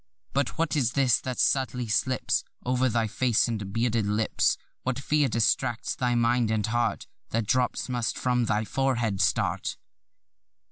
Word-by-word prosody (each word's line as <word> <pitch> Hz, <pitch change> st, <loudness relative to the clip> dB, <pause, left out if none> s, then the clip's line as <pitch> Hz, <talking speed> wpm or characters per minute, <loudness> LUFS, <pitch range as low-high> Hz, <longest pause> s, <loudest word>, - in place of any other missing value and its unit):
But 140 Hz, -1 st, -1 dB
what 165 Hz, -2 st, 0 dB
is 125 Hz, -4 st, +1 dB
this 135 Hz, -4 st, +3 dB
that 130 Hz, -1 st, -5 dB
subtly 130 Hz, -3 st, +1 dB
slips 125 Hz, +3 st, 0 dB, 0.2 s
Over 125 Hz, +1 st, +2 dB
thy 115 Hz, 0 st, +1 dB
face 120 Hz, +2 st, +1 dB
and 105 Hz, -4 st, -4 dB
bearded 115 Hz, -1 st, 0 dB
lips? 105 Hz, +1 st, +1 dB, 0.2 s
What 130 Hz, -1 st, -2 dB
fear 145 Hz, +1 st, +1 dB
distracts 115 Hz, +1 st, 0 dB
thy 125 Hz, -1 st, 0 dB
mind 120 Hz, -1 st, +2 dB
and 110 Hz, -2 st, 0 dB
heart, 120 Hz, +1 st, -1 dB, 0.2 s
That 115 Hz, -1 st, -1 dB
drops 125 Hz, +4 st, 0 dB
must 120 Hz, -3 st, -2 dB
from 125 Hz, -1 st, +1 dB
thy 110 Hz, 0 st, 0 dB
forehead 120 Hz, -6 st, 0 dB
start? -, -, 0 dB
120 Hz, 150 wpm, -27 LUFS, 110-130 Hz, 0.2 s, this